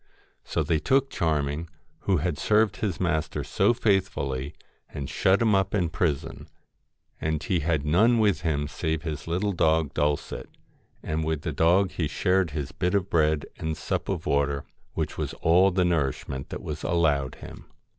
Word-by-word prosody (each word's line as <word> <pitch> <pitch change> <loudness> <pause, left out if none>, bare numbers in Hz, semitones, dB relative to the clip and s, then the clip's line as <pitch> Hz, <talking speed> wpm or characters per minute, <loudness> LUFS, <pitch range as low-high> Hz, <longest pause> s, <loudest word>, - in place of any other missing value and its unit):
So - - -1
they 80 -2 +1
took 135 - +2
Charming, 75 0 -1 0.4
who 95 -2 +3
had 80 -1 -2
served 105 +2 +2
his 100 -6 -2
master 80 -3 -1
so - - +2
faithfully, 95 - 0 0.3
and 70 -2 -5
shut 95 - +2
him 110 -2 +3
up 95 0 +2
in 90 -5 +1
prison; 80 -4 -2 0.7
and 80 0 -1
he 90 - +1
had 75 -2 0
none 110 +11 +4
with 105 -3 +2
him 75 -4 0
save 80 +1 -2
his 75 -2 -5
little 95 +5 0
dog 80 -4 +2
Dulcet, 75 -1 -1 0.5
and 80 +1 -2
with 80 -1 -2
the 75 - -2
dog 90 +5 +3
he 80 -4 -1
shared 90 +3 +1
his 70 -2 -4
bit 90 +2 -1
of 100 -1 0
bread 80 -2 +2
and 80 -1 -3
sup - - -3
of - - -2
water, 70 0 0 0.3
which - - -3
was - - -3
all 90 +4 +4
the 90 -1 +1
nourishment 70 -5 -1
that - - -6
was 75 0 -5
allowed 75 -6 +1
him. - - -11
80 Hz, 170 wpm, -26 LUFS, 75-95 Hz, 0.7 s, none